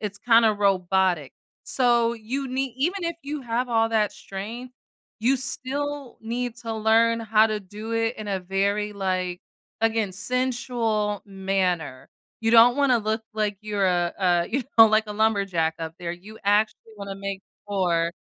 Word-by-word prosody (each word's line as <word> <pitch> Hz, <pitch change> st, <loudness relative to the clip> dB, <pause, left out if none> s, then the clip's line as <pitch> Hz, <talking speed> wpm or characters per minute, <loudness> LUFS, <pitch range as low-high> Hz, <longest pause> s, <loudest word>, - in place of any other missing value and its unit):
It's 200 Hz, -1 st, -5 dB
kinda 230 Hz, -1 st, +5 dB
robotic, 190 Hz, -6 st, +1 dB, 0.3 s
so 240 Hz, -2 st, +2 dB
you 250 Hz, +5 st, -4 dB
need 260 Hz, -1 st, -2 dB
even 350 Hz, +6 st, -1 dB
if 335 Hz, -1 st, -2 dB
you 290 Hz, +1 st, -4 dB
have 240 Hz, +1 st, -1 dB
all 225 Hz, -1 st, +3 dB
that 215 Hz, -2 st, +1 dB
strength, 230 Hz, +6 st, -8 dB, 0.5 s
you 260 Hz, +4 st, +3 dB
still 275 Hz, +1 st, -4 dB
need 240 Hz, +1 st, -3 dB
to 225 Hz, -1 st, -5 dB
learn 225 Hz, +1 st, +3 dB
how 220 Hz, 0 st, +4 dB
to 215 Hz, -1 st, -1 dB
do 210 Hz, +4 st, -8 dB
it 225 Hz, +1 st, 0 dB
in 215 Hz, -1 st, -7 dB
a 190 Hz, -2 st, -1 dB
very, 200 Hz, +3 st, -1 dB
like, 185 Hz, -2 st, -2 dB, 0.4 s
again, 225 Hz, -4 st, +1 dB
sensual 235 Hz, -1 st, -1 dB
manner. 190 Hz, -8 st, -2 dB, 0.3 s
You 225 Hz, -, +1 dB
don't 235 Hz, +2 st, +7 dB
wanna 270 Hz, -4 st, +3 dB
look 220 Hz, +1 st, -2 dB
like 210 Hz, -2 st, -1 dB
you're 205 Hz, -2 st, 0 dB
a 175 Hz, -1 st, +1 dB
a 175 Hz, -2 st, +2 dB
you 265 Hz, +2 st, 0 dB, 0.2 s
know, 225 Hz, -, +11 dB
like 215 Hz, 0 st, +3 dB
a 210 Hz, -, -5 dB
lumberjack 195 Hz, -7 st, +1 dB
up 165 Hz, 0 st, -5 dB
there 170 Hz, -1 st, -4 dB
you 205 Hz, +5 st, -12 dB
actually 215 Hz, +2 st, +1 dB
wanna 200 Hz, -1 st, -6 dB
make 195 Hz, -1 st, -5 dB, 0.3 s
more. 170 Hz, -4 st, +1 dB
215 Hz, 160 wpm, -25 LUFS, 195-235 Hz, 0.5 s, know